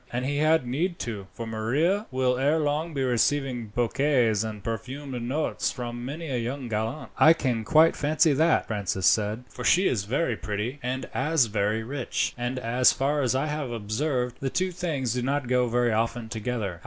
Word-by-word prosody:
And 125 +1 -2
he 145 +1 -1
had 155 -1 +3
need 165 +9 -1
to, 105 -5 -5
for 115 - -7
Maria 140 - 0
will 130 -1 +1
ere 145 +4 +3
long 155 +2 -1
be 135 - 0
receiving 125 -1 0
bouquets 120 -1 +1
and 105 -3 -6
perfumed 125 +4 -5
notes 135 +6 -1
from 120 -1 -6
many 155 +6 -5
a 125 - 0
young 125 +3 -4
gallant." 110 +7 -3
"I 160 - +8
can 125 -8 -1
quite 160 +8 +5
fancy 155 +1 +3
that," 160 +4 +3
Francis 95 -4 -2
said, 110 +2 +2
"for 125 - -9
she 185 +10 +4
is 100 -6 0
very 125 +2 0
pretty 105 +7 -4
as 130 +1 -2
well - - -10 0.2
as 150 -7 +5
very 105 +1 -1
rich, 130 +2 -2
and, 120 +1 -3
as 125 +1 +3
far 145 +2 0
as 130 -1 +1
I 135 - +1
have 150 -3 -3
observed, 120 +3 -2
the 135 - -2
two 185 +6 0
things 155 -9 -2
do 125 - -1
not 135 +1 -1
go 125 0 +2
very 120 0 +1
often 115 +1 -1
together. 110 -6 -3
125 Hz, 190 wpm, -26 LUFS, 115-145 Hz, 0.2 s, I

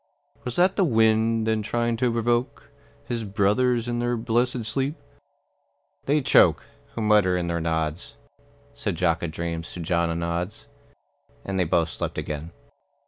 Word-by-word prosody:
Was 125 -1 -4
that 180 +2 +3
the 195 - +4
wind 110 -4 +3
then 110 -1 +1
trying 120 +2 -1
to 125 0 +1
provoke 120 +1 -1 0.3
His 115 -2 -3
brothers 115 +4 +1
in 120 0 -1
their 120 0 0
blessed 120 +1 0
sleep?" 135 +6 -1 1.1
"They 145 +2 +3
choke, - - +5 0.3
Who 115 - -2
mutter 105 -4 +4
in 90 - -1
their 85 -1 -2
nods," 80 -1 -2 0.6
Said - - -3
Jock 85 -1 +1
a 85 - -2
dreams 85 0 -5
to - - -7
John 85 0 0
a 85 - -2
nods. 85 +4 -3 0.8
And 95 -1 -2
they 90 - +3
both 85 0 +1
slept - - -5
again. 75 +2 -4
110 Hz, 155 wpm, -25 LUFS, 85-120 Hz, 1.1 s, choke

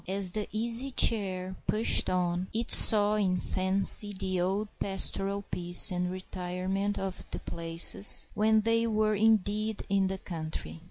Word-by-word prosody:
As 190 -1 -2
the 210 +2 -5
Easy 230 +4 0
Chair 190 -7 +1
pushed 220 +2 +3
on, 180 0 -3
it 230 +2 -4
saw 210 -1 +5
in 185 -3 -1
fancy 195 +2 +2
the 185 -2 -3
old 195 +4 -3
pastoral 195 0 -2
peace 175 +1 +5
and 180 0 -4
retirement 185 +2 -5
of 190 -1 -7
the - - -7
places 165 +4 +2
when 215 +1 +1
they 230 +1 -1
were 215 -1 -1
indeed 215 0 -1
in 195 -1 0
the 190 0 -5
country. 155 - -8
195 Hz, 145 wpm, -27 LUFS, 185-215 Hz, -, saw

